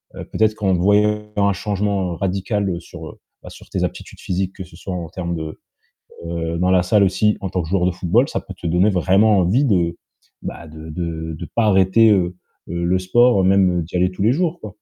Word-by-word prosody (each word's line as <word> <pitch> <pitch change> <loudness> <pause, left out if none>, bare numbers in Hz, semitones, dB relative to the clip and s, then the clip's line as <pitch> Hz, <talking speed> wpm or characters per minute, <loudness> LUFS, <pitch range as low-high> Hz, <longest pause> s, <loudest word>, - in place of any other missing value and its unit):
heu, - - -7
peut-être 110 -1 +1
qu'en 95 -3 0
voyant 105 +4 +2
un 100 0 +3
changement 100 -2 -2
radical 95 -1 -2
sur, - - -10
heu, - - -12 0.2
bah, - - -9
sur - - -14
tes - - -2
aptitudes - - -8
physiques, 95 +1 -2
que 95 - -8
ce 85 - -17
soit 95 +2 -7
en 85 -2 -5
termes 85 -1 -4
de, 80 -1 -6 0.7
heu, 85 0 -3
dans 90 +1 +1
la 90 -1 +4
salle 100 +3 +3
aussi 105 +3 +2
en 95 - -3
tant 90 -1 -1
que 80 - -7
joueur 90 -1 +1
de 90 - +1
football. 95 +9 +1
Ça - - -3
peut 95 - -10
te 90 - -7
donner 90 +5 +3
vraiment 95 +3 +3
envie 95 +10 +2
de, 85 -8 +1 0.5
bah, 85 - -7
de 80 +1 -10
de 80 -1 -4
de 85 +2 -8
pas 115 - +2
arrêter, 100 +3 +4
heu, 90 -2 0 0.3
heu, 85 0 -2
le 90 +2 +2
sport, 120 +3 +3
même 95 -2 +3
d'y 85 +3 -6
aller 90 +1 +2
tous 90 - -5
les 110 +4 +4
jours, 170 +3 -1
quoi. 110 - -7
95 Hz, 225 wpm, -20 LUFS, 85-105 Hz, 0.7 s, la